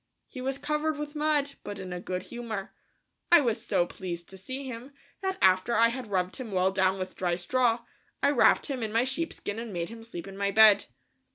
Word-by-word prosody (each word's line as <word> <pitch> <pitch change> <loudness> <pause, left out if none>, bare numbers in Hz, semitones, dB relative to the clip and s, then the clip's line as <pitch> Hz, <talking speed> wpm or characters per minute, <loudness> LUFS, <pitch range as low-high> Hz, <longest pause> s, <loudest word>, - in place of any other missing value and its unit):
He 255 - -9
was 265 +1 -1
covered 300 +2 -1
with 295 0 -5
mud, 300 -2 +1
but 205 - -6
in 185 -2 -6
a 180 - -4
good 180 0 -4
humor. 225 -5 -6 0.6
I 345 - +9
was 230 -3 0
so 175 -6 +2
pleased 175 -2 -6
to 190 - -11
see 260 +8 -6
him, 255 +2 -7 0.3
that 380 0 -1
after 190 +5 +4
I 230 +1 +5
had 250 0 -5
rubbed 185 -2 -1
him 245 -5 -6
well 185 0 +2
down 190 0 +2
with 185 0 -5
dry 175 -2 0
straw, 235 +5 +1 0.4
I 280 - +5
wrapped 275 - +4
him 270 -3 -4
in 220 -1 -2
my 230 +2 +3
sheepskin 265 -6 -3
and 230 -1 -6
made 170 -2 -3
him 230 0 -10
sleep 200 -6 -8
in 195 - -9
my 200 0 0
bed. 210 -1 +6
225 Hz, 215 wpm, -28 LUFS, 190-265 Hz, 0.6 s, I